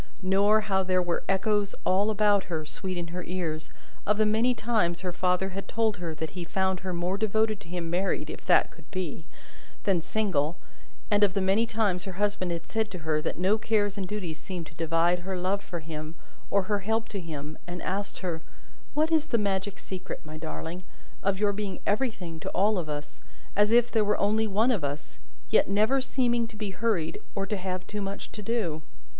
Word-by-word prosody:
Nor, 200 Hz, +3 st, +5 dB
how 195 Hz, -3 st, +2 dB
there 185 Hz, -1 st, +2 dB
were 175 Hz, -1 st, 0 dB
echoes 205 Hz, +1 st, +2 dB
all 195 Hz, +3 st, +3 dB
about 205 Hz, -2 st, +4 dB
her, 160 Hz, -3 st, -3 dB
sweet 185 Hz, +4 st, -3 dB
in 170 Hz, -1 st, -3 dB
her 180 Hz, +1 st, -4 dB
ears, 165 Hz, -4 st, -3 dB, 0.3 s
of 210 Hz, 0 st, +2 dB
the 215 Hz, -, +4 dB
many 225 Hz, +4 st, +3 dB
times 195 Hz, -8 st, +1 dB
her 185 Hz, -1 st, -1 dB
father 180 Hz, +1 st, +1 dB
had 195 Hz, +1 st, -5 dB
told 220 Hz, -2 st, +1 dB
her 170 Hz, -3 st, -4 dB
that 155 Hz, 0 st, -4 dB
he 180 Hz, +1 st, -5 dB
found 190 Hz, +2 st, 0 dB
her 185 Hz, 0 st, -4 dB
more 180 Hz, +3 st, -1 dB
devoted 220 Hz, 0 st, +2 dB
to -, -, -14 dB
him 175 Hz, -1 st, -3 dB
married 185 Hz, +3 st, 0 dB
(if -, -, -7 dB
that -, -, +5 dB
could -, -, -17 dB
be) 175 Hz, -3 st, -4 dB, 0.6 s
than 190 Hz, -4 st, +2 dB
single, 170 Hz, -5 st, 0 dB, 0.5 s
and 205 Hz, 0 st, +5 dB
of 195 Hz, -2 st, +4 dB
the -, -, +3 dB
many 195 Hz, +4 st, +3 dB
times 205 Hz, -5 st, +1 dB
her 190 Hz, -, -5 dB
husband 205 Hz, -1 st, 0 dB
had 170 Hz, -1 st, -3 dB
said 220 Hz, -1 st, 0 dB
to 185 Hz, -, -6 dB
her 155 Hz, -1 st, +2 dB
that -, -, -2 dB
no 190 Hz, +5 st, +3 dB
cares 205 Hz, -2 st, +1 dB
and 195 Hz, -3 st, -3 dB
duties 180 Hz, -6 st, -4 dB
seemed 180 Hz, -3 st, -5 dB
to -, -, -13 dB
divide 165 Hz, +2 st, +2 dB
her 185 Hz, +1 st, -3 dB
love 190 Hz, +3 st, 0 dB
for 170 Hz, -3 st, -5 dB
him 155 Hz, 0 st, -6 dB, 0.3 s
or 200 Hz, -1 st, +3 dB
her 205 Hz, +2 st, 0 dB
help 220 Hz, +3 st, 0 dB
to 200 Hz, -, -3 dB
him, 155 Hz, -3 st, -6 dB
and 175 Hz, 0 st, -4 dB
asked 200 Hz, +2 st, -2 dB
her 170 Hz, -4 st, -2 dB, 0.5 s
"What 310 Hz, +2 st, +3 dB
is 315 Hz, -1 st, +3 dB
the 235 Hz, -, +2 dB
magic 200 Hz, -1 st, 0 dB
secret, 185 Hz, -3 st, -6 dB
my 155 Hz, 0 st, -8 dB
darling, 160 Hz, +2 st, -5 dB, 0.4 s
of 195 Hz, 0 st, +1 dB
your 205 Hz, -1 st, +3 dB
being 200 Hz, -2 st, -3 dB
everything 205 Hz, -7 st, -1 dB
to -, -, -4 dB
all 205 Hz, +2 st, +3 dB
of 160 Hz, -3 st, -4 dB
us, 145 Hz, -4 st, -5 dB, 0.3 s
as 205 Hz, +1 st, +5 dB
if 240 Hz, +1 st, +5 dB
there 220 Hz, -2 st, +4 dB
were 210 Hz, 0 st, +2 dB
only 220 Hz, +2 st, +2 dB
one 215 Hz, +5 st, +3 dB
of 205 Hz, -10 st, 0 dB
us, 145 Hz, 0 st, -4 dB, 0.3 s
yet 220 Hz, -, +5 dB
never 215 Hz, +7 st, +3 dB
seeming 240 Hz, -3 st, +1 dB
to 225 Hz, -, -13 dB
be 210 Hz, -2 st, -3 dB
hurried, 190 Hz, -4 st, 0 dB
or 195 Hz, -1 st, 0 dB
to 210 Hz, -, -1 dB
have 185 Hz, -1 st, -3 dB
too 210 Hz, 0 st, -4 dB
much 195 Hz, 0 st, -4 dB
to 210 Hz, -, -7 dB
do?" 200 Hz, -8 st, -1 dB
190 Hz, 210 wpm, -28 LUFS, 175-210 Hz, 0.6 s, Nor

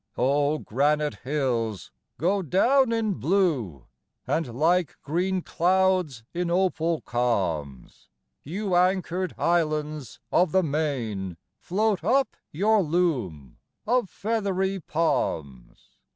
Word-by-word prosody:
O 145 Hz, +4 st, +2 dB
granite 150 Hz, +4 st, 0 dB
hills, 125 Hz, -7 st, -2 dB, 0.3 s
go 195 Hz, +5 st, +1 dB
down 235 Hz, -, +3 dB
in 225 Hz, -3 st, 0 dB
blue! 145 Hz, -, 0 dB, 0.4 s
And 140 Hz, -8 st, -2 dB
like 170 Hz, +1 st, +2 dB
green 180 Hz, +4 st, -1 dB
clouds 180 Hz, -7 st, +1 dB
in 175 Hz, 0 st, -1 dB
opal 170 Hz, -3 st, +1 dB
calms, 85 Hz, -, -2 dB, 0.3 s
You 190 Hz, +6 st, -3 dB
anchored 185 Hz, 0 st, +1 dB
islands 155 Hz, -5 st, -1 dB
of 180 Hz, -2 st, +3 dB
the 190 Hz, 0 st, +4 dB
main, 120 Hz, -, -2 dB, 0.2 s
Float 205 Hz, 0 st, 0 dB
up 265 Hz, +7 st, +2 dB, 0.2 s
your 210 Hz, +6 st, +3 dB
loom 135 Hz, -, -1 dB, 0.3 s
of 240 Hz, -3 st, +1 dB
feathery 195 Hz, -3 st, -1 dB
palms! 80 Hz, -, -3 dB
165 Hz, 100 wpm, -26 LUFS, 130-190 Hz, 0.4 s, the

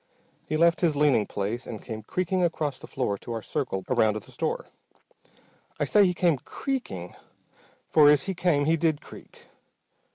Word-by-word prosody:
He 155 Hz, -, -1 dB
left 170 Hz, +1 st, +3 dB
his 165 Hz, -4 st, +2 dB
leaning 140 Hz, -8 st, +3 dB
place, 105 Hz, +5 st, -3 dB
and 110 Hz, -, -6 dB
came 110 Hz, 0 st, -7 dB
creaking 185 Hz, -, -1 dB
across 155 Hz, -5 st, -1 dB
the -, -, -11 dB
floor 105 Hz, -7 st, -2 dB
to 120 Hz, -, -6 dB
our 115 Hz, -2 st, -4 dB
circle 95 Hz, -1 st, -3 dB
around 110 Hz, -1 st, +2 dB
the 110 Hz, -, -8 dB
store. -, -, -2 dB, 1.1 s
I -, -, +1 dB
say 205 Hz, -2 st, +5 dB
he 180 Hz, -, 0 dB
came 170 Hz, -5 st, +2 dB
"creaking" 100 Hz, -, -5 dB, 0.7 s
for 150 Hz, -2 st, +6 dB
as 145 Hz, -2 st, +5 dB
he 190 Hz, -, -2 dB
came 170 Hz, -5 st, +1 dB
he 165 Hz, +2 st, +3 dB
did 160 Hz, -2 st, +1 dB
creak. -, -, -15 dB
145 Hz, 170 wpm, -26 LUFS, 110-170 Hz, 1.1 s, for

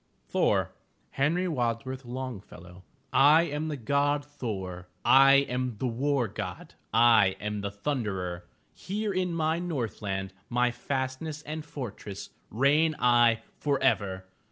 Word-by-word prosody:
THOR -, -, +1 dB, 0.4 s
Henry 165 Hz, +7 st, +1 dB
Wadsworth 130 Hz, -2 st, -2 dB
Longfellow 100 Hz, -8 st, -8 dB, 0.3 s
I 150 Hz, +4 st, +6 dB
am 155 Hz, -1 st, -3 dB
the 150 Hz, -2 st, -3 dB
God 145 Hz, +4 st, +1 dB
Thor, 95 Hz, -11 st, -6 dB, 0.2 s
I 135 Hz, +2 st, +7 dB
am 125 Hz, -2 st, -2 dB
the 130 Hz, -, -3 dB
War 130 Hz, +1 st, 0 dB
God, 95 Hz, -3 st, -7 dB, 0.2 s
I 115 Hz, -4 st, +5 dB
am 105 Hz, 0 st, -3 dB
the 100 Hz, -, -2 dB
Thunderer! 100 Hz, -7 st, -3 dB, 0.3 s
Here 205 Hz, +2 st, -3 dB
in 185 Hz, -1 st, 0 dB
my 160 Hz, 0 st, +1 dB
Northland, 105 Hz, -, -3 dB, 0.2 s
My 125 Hz, 0 st, +2 dB
fastness 130 Hz, +4 st, -4 dB
and 155 Hz, +1 st, -5 dB
fortress, 115 Hz, -9 st, -7 dB, 0.2 s
Reign 150 Hz, +7 st, +3 dB
I 120 Hz, -2 st, +4 dB, 0.2 s
forever! 100 Hz, -10 st, 0 dB
125 Hz, 120 wpm, -28 LUFS, 105-145 Hz, 0.4 s, I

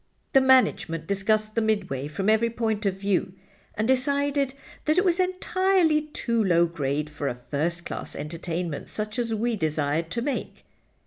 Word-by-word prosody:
"The 270 Hz, -, +7 dB
management 255 Hz, -11 st, +3 dB
discussed 215 Hz, +3 st, +1 dB
the 230 Hz, -, +1 dB
Midway 190 Hz, -11 st, -1 dB
from 190 Hz, +6 st, -3 dB
every 220 Hz, +2 st, +4 dB
point 220 Hz, -3 st, -1 dB
of 190 Hz, -, 0 dB
view, 195 Hz, -2 st, 0 dB, 0.4 s
and 215 Hz, +1 st, 0 dB
decided 280 Hz, +1 st, +1 dB, 0.3 s
that 310 Hz, +2 st, +2 dB
it 370 Hz, -, +4 dB
was 350 Hz, 0 st, +2 dB
entirely 370 Hz, -4 st, +2 dB
too 235 Hz, -6 st, 0 dB
low 170 Hz, -3 st, +4 dB
grade 150 Hz, -3 st, -2 dB
for 150 Hz, -1 st, -4 dB
a 120 Hz, -, -2 dB
first 160 Hz, +7 st, -2 dB
class -, -, -5 dB
entertainment 165 Hz, +1 st, -4 dB
such 215 Hz, +2 st, -3 dB
as 230 Hz, -2 st, 0 dB
we 230 Hz, +2 st, 0 dB
desired 155 Hz, -2 st, -1 dB
to 235 Hz, +7 st, -2 dB
make. 280 Hz, 0 st, -4 dB
215 Hz, 165 wpm, -26 LUFS, 165-260 Hz, 0.4 s, The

